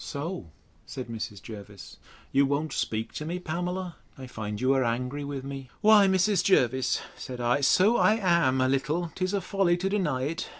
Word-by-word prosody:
So, 145 Hz, -, -5 dB, 0.4 s
said 125 Hz, -3 st, -7 dB
Mrs. 110 Hz, -4 st, -6 dB
Jervis, 105 Hz, -2 st, -10 dB, 0.3 s
you 140 Hz, 0 st, +3 dB
won't 145 Hz, +2 st, -1 dB
speak 110 Hz, +1 st, -2 dB
to -, -, -5 dB
me, 170 Hz, +3 st, -3 dB
Pamela! 180 Hz, +1 st, -4 dB, 0.2 s
I 130 Hz, -, -8 dB
find 105 Hz, -4 st, -6 dB
you 130 Hz, +3 st, +3 dB
are 135 Hz, -1 st, +2 dB
angry 125 Hz, +4 st, -2 dB
with 140 Hz, -2 st, -5 dB
me. 135 Hz, -1 st, -7 dB
Why, 210 Hz, -2 st, +7 dB
Mrs. 190 Hz, 0 st, +2 dB
Jervis, 130 Hz, -8 st, +2 dB, 0.2 s
said 125 Hz, -1 st, -8 dB
I, 120 Hz, +4 st, +1 dB
so 190 Hz, -, +4 dB
I 215 Hz, -, +4 dB
am, 170 Hz, -11 st, +2 dB
a 130 Hz, -, +3 dB
little; 150 Hz, +6 st, -1 dB
'tis 185 Hz, +2 st, -1 dB
a 200 Hz, -, 0 dB
folly 180 Hz, -1 st, +1 dB
to 190 Hz, +2 st, -1 dB
deny 160 Hz, -11 st, 0 dB
it. 165 Hz, +6 st, -3 dB
145 Hz, 185 wpm, -27 LUFS, 130-180 Hz, 0.4 s, Why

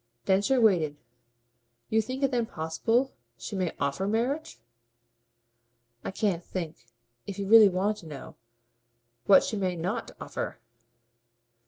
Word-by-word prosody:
Densher 205 Hz, +8 st, +3 dB
waited. 170 Hz, -10 st, +3 dB, 0.9 s
"You 220 Hz, 0 st, +4 dB
think 255 Hz, +5 st, -5 dB
it 275 Hz, -, +3 dB
then 240 Hz, -3 st, 0 dB
possible 225 Hz, +12 st, 0 dB, 0.2 s
she 115 Hz, +10 st, -6 dB
may 185 Hz, -3 st, 0 dB
OFFER 140 Hz, +7 st, -1 dB
marriage?" 250 Hz, +9 st, -1 dB, 1.5 s
"I -, -, -3 dB
can't 190 Hz, -3 st, -1 dB
think 165 Hz, -10 st, -6 dB, 0.4 s
if 200 Hz, -, -5 dB
you 200 Hz, -1 st, -3 dB
really 220 Hz, -1 st, +9 dB
want 195 Hz, +3 st, 0 dB
to 170 Hz, -, -12 dB
know 145 Hz, -3 st, -9 dB, 0.9 s
what 195 Hz, -, +7 dB
she 215 Hz, -, -2 dB
may 185 Hz, -2 st, -1 dB
NOT 170 Hz, +2 st, -3 dB
offer!" -, -, -5 dB
195 Hz, 130 wpm, -28 LUFS, 170-225 Hz, 1.5 s, really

